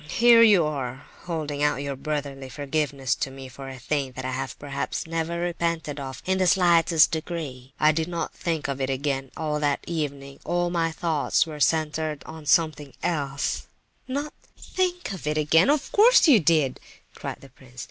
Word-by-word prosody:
"Here 235 +5 +6
you 205 -8 +6
are 135 -3 -4 0.2
holding 155 -4 -3
out 145 -2 +1
your 140 -1 -3
brotherly 140 -2 -4
forgiveness 140 -1 -1
to - - -2
me 135 0 -9
for 135 +1 -9
a 130 - -8
thing 135 0 -2
that 130 +1 -6
I 130 - -2
have 135 +1 -4
perhaps 140 +4 -4
never 165 +1 -2
repented 170 -4 -2
of 135 -2 -7
in 190 0 +1
the 185 - +3
slightest 170 -2 +5
degree. 155 -6 -5
I 155 0 +5
did 160 +1 -1
not 170 -1 -4
think 165 -4 -2
of 140 -1 -3
it 130 - -1
again 135 0 -2
all 150 -2 -1
that 145 -1 0
evening; 140 -4 -4
all 175 0 0
my 165 -2 0
thoughts 160 -1 +1
were 155 -2 -8
centred 155 -1 0
on 160 -2 -10
something 155 -5 +2
else—" 140 -4 -2 0.4
"Not 285 +3 -3 0.3
think 360 - -2
of 180 -6 -7
it 150 0 0
again? 160 - +4
Of 295 0 +1
course 455 -1 +6
you 265 -8 +7
didn't!" 155 -6 +2 0.3
cried - - -7
the 135 - -14
prince. 125 0 -16
150 Hz, 180 wpm, -25 LUFS, 135-170 Hz, 0.4 s, you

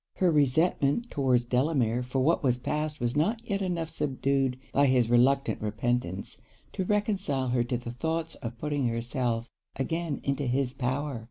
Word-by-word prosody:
Her 180 -2 +3
resentment 150 - +2
towards 130 -4 +2
Delamere 125 -2 +1
for 125 +1 -1
what 165 +5 +3
was 125 -3 +2
passed 150 +4 -2
was 120 +1 -1
not 210 +10 +2
yet 200 -1 -1
enough 175 -4 -2
subdued 135 -3 0 0.2
by 140 0 +4
his 125 -3 +3
reluctant 135 +3 +3
repentance, 105 -3 -2 0.3
to 190 - -1
reconcile 195 - 0
her 120 -1 +2
to 120 0 -1
the 120 0 -6
thoughts 160 +5 -2
of 115 0 -7
putting 145 -1 -1
herself 115 0 -2 0.2
again 160 +2 -2
into 140 0 -1
his 130 0 0
power. 135 +1 -2
135 Hz, 160 wpm, -28 LUFS, 120-155 Hz, 0.3 s, by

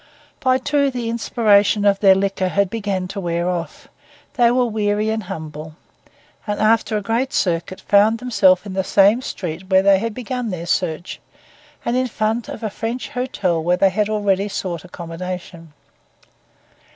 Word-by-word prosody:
By 255 -1 +2
two 280 +1 +1
the 245 -3 -4
inspiration 210 -3 +2
of 200 -1 +3
their 195 -2 +6
liquor 195 -1 0
had 200 0 0
begun 200 -4 -2
to 200 - -5
wear 170 -1 -1
off; 175 -2 -4 0.5
they 240 -2 +4
were 250 +1 +2
weary 210 -1 0
and 220 0 -2
humble, 155 -2 -7 0.7
and 205 0 -2
after 220 0 +2
a 205 - -4
great 235 +6 -1
circuit 180 0 -1
found 210 +3 +4
themselves 210 -6 +3
in 195 - -6
the 190 0 0
same 200 +5 +4
street 180 -5 -6
where 190 0 +4
they 195 -1 +5
had 225 0 -3
begun 250 -1 -4
their 175 -3 -5
search, 175 -1 -2 0.7
and 235 - 0
in 255 0 +1
front 220 0 -2
of 230 - -7
a 215 - -1
French 230 +5 -4
hotel 240 - -1
where 175 +2 +2
they 195 +1 +3
had 210 +2 0
already 205 -2 +1
sought 180 -5 -4
accommodation. 175 -1 -7
200 Hz, 165 wpm, -20 LUFS, 185-225 Hz, 0.7 s, their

